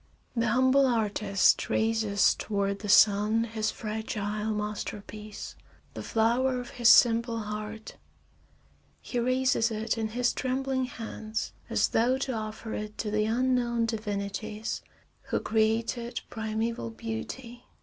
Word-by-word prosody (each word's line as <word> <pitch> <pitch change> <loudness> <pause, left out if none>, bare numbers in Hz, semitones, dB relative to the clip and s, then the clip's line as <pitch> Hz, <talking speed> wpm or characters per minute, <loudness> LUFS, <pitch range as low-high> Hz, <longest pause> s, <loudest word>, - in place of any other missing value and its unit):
The 230 -1 +1
humble 260 +4 +4
artist 210 -4 +2
raises 220 -2 +2
toward 200 -1 -2
the 205 - -6
sun 210 +2 +5
his 220 -1 -2
fragile 215 -1 -3
masterpiece, 210 0 -5 0.4
the - - -6
flower 245 +3 +1
of 245 - -7
his 240 -1 +4
simple 230 -1 +5
heart; 215 +1 -6 1.0
he 245 - -3
raises 255 -1 +2
it 225 +1 -2
in 220 - 0
his 240 +2 0
trembling 260 0 -1
hands 220 -3 -5 0.2
as - - +2
though 245 +3 +2
to 265 -1 -2
offer 220 0 -5
it 210 0 -5
to 210 - -3
the 215 0 +1
unknown 240 0 +1
divinities 210 0 -3 0.4
who - - -1
created 225 +2 0
primeval 220 - -2
beauty. 115 - -6
220 Hz, 120 wpm, -28 LUFS, 210-240 Hz, 1.0 s, sun